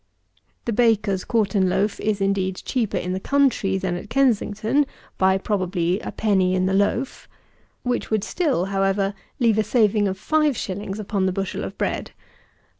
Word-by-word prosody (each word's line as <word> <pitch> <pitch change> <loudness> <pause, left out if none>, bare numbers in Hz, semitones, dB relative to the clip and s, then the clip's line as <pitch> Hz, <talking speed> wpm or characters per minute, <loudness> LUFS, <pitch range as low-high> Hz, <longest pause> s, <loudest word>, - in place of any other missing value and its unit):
The 235 - -1
baker's 215 -4 +2
quartern 200 -5 +1
loaf 205 +3 0
is 210 -2 -1
indeed 195 -1 0
cheaper 225 -7 -1
in 180 0 -2
the 190 - -2
country 255 -6 +2
than 185 -2 -2
at 175 - -7
Kensington, 235 +1 +2 0.3
by, 190 0 +4
probably, 185 -2 -1
a - - -6
penny 190 -4 +2
in 185 0 +1
the 190 - +1
loaf; 205 +6 0 0.5
which 245 -1 -1
would 215 -2 +1
still, 285 - 0
however, 195 +1 +1 0.3
leave 225 -4 +3
a - - +3
saving 210 -3 +2
of 190 0 -3
5_s._ 210 -9 -1
upon 200 -2 -1
the - - +1
bushel 195 +1 -3
of - - -6
bread. - - -2
200 Hz, 160 wpm, -23 LUFS, 190-225 Hz, 0.5 s, by